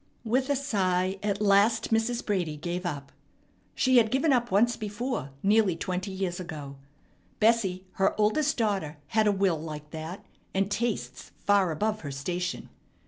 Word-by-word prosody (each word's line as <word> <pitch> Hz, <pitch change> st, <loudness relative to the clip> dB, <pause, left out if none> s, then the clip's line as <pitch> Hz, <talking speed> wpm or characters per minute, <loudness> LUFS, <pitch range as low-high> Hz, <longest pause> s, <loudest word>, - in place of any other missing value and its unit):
With 255 Hz, +4 st, 0 dB
a 285 Hz, -, +3 dB
sigh 190 Hz, -8 st, 0 dB
at 205 Hz, 0 st, -1 dB
last 210 Hz, +3 st, +3 dB
Mrs. 225 Hz, +2 st, +1 dB
Brady 175 Hz, -7 st, -1 dB
gave 175 Hz, +3 st, -3 dB
up. 140 Hz, -4 st, -5 dB, 0.6 s
She 260 Hz, -1 st, +4 dB
had 225 Hz, -2 st, +5 dB
given 270 Hz, +4 st, +2 dB
up 240 Hz, -1 st, +1 dB
once 225 Hz, +4 st, +3 dB
before 210 Hz, -, -3 dB
nearly 205 Hz, -3 st, +4 dB
twenty 185 Hz, +3 st, -3 dB
years 190 Hz, -2 st, -3 dB
ago. 150 Hz, -6 st, -7 dB, 0.6 s
Bessie, 210 Hz, -5 st, +2 dB
her 195 Hz, +2 st, 0 dB
oldest 270 Hz, +8 st, +2 dB
daughter, 195 Hz, -10 st, -1 dB
had 220 Hz, -1 st, +3 dB
a -, -, +5 dB
will 190 Hz, -5 st, +1 dB
like 150 Hz, -2 st, -7 dB
that, 160 Hz, +4 st, -7 dB, 0.3 s
and 195 Hz, +1 st, +1 dB
tastes 230 Hz, +2 st, -2 dB, 0.2 s
far 200 Hz, -3 st, +4 dB
above 215 Hz, +7 st, -1 dB
her 145 Hz, -, -5 dB
station. 175 Hz, +6 st, -3 dB
195 Hz, 155 wpm, -28 LUFS, 175-225 Hz, 0.6 s, had